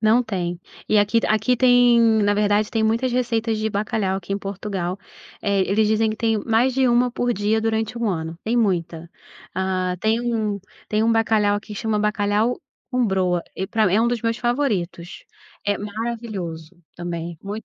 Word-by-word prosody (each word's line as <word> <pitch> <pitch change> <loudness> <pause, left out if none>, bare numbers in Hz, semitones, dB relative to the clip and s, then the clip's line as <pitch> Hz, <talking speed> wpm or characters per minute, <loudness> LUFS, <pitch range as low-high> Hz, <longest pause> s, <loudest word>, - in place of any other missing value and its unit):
Não 225 +3 +4
tem, 180 -6 -3 0.3
e 215 - +4
aqui 205 +3 +3
aqui 220 +4 +2
tem, 245 -1 +5 0.2
na 205 0 +3
verdade, 205 0 +2
tem 225 - 0
muitas 230 +4 +1
receitas 235 -2 0
de 220 0 -1
bacalhau 205 -2 -1
aqui 195 0 -6
em 200 - -1
Portugal, 195 -2 -4 0.4
eh, 200 -1 +1
eles 210 +3 +2
dizem 220 0 +2
que 215 - -4
tem 225 -1 +1
mais 240 +3 +2
de 265 0 +3
1 245 +1 +3
por 245 0 0
dia 210 +1 0
durante 225 +1 -1
1 235 -2 0
ano, 165 -3 -3
tem 230 +2 0
muita. 170 -6 -1 0.4
Ah, 185 -1 -1
tem 220 +4 +1
um 210 -3 -1 0.3
tem 215 0 +1
um 225 - +3
bacalhau 220 -2 +2
aqui 210 0 -7
chama 215 +1 -1
bacalhau 210 +2 +1 0.3
com 250 -3 +1
broa, 185 -3 +1
e 190 - -2
pra 220 +2 +1
mim 185 - +2
é 215 - +4
um 235 - +2
dos 240 -1 -1
meus 230 0 0
favoritos. 215 -10 -2 0.4
É 205 -1 0
maravilhoso, 205 -6 -5 0.2
também, 170 -1 -5
muito 205 +2 -6
215 Hz, 185 wpm, -22 LUFS, 190-230 Hz, 0.4 s, tem